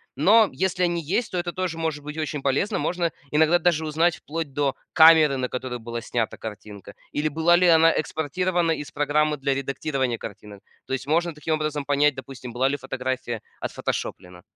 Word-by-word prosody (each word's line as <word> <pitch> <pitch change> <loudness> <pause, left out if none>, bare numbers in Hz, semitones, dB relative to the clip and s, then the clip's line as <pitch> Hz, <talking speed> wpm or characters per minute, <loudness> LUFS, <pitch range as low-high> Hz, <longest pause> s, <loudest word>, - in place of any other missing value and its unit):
Но 210 +8 +5
если 185 -1 -1
они 170 -1 -1
есть, 210 +9 -1
то 180 - -3
это 175 0 -2
тоже 185 -3 -3
может 160 -3 -3
быть 150 +1 -7
очень 150 -2 -3
полезно. 145 +10 0
Можно 175 -2 -1 0.2
иногда 160 +3 +4
даже 160 -2 +1
узнать 160 +2 +2
вплоть 155 -2 -5
до 140 -2 0 0.2
камеры, 160 -3 +7
на 125 -1 -2
которую 125 -1 -4
была 115 +1 -5
снята 115 -1 -2
картинка 105 -2 -9 0.2
или 150 +1 -1
была 160 +3 +3
ли 180 +1 +4
она 165 -1 +6
экспортирована 170 +3 -1
из 145 -2 -4
программы 150 +1 +1
для 135 0 0
редактирования 135 -2 -2
картинок. 100 -1 -10 0.3
То - - -4
есть 135 - -3
можно 170 +3 +1
таким 155 +1 -2
образом 155 -2 -2
понять, 145 0 +2
допустим, 130 -2 -9
была 130 +3 +2
ли 145 - -1
фотография 130 -3 -4 0.2
отфотошоплена. 90 -1 -4
150 Hz, 180 wpm, -24 LUFS, 130-165 Hz, 0.3 s, камеры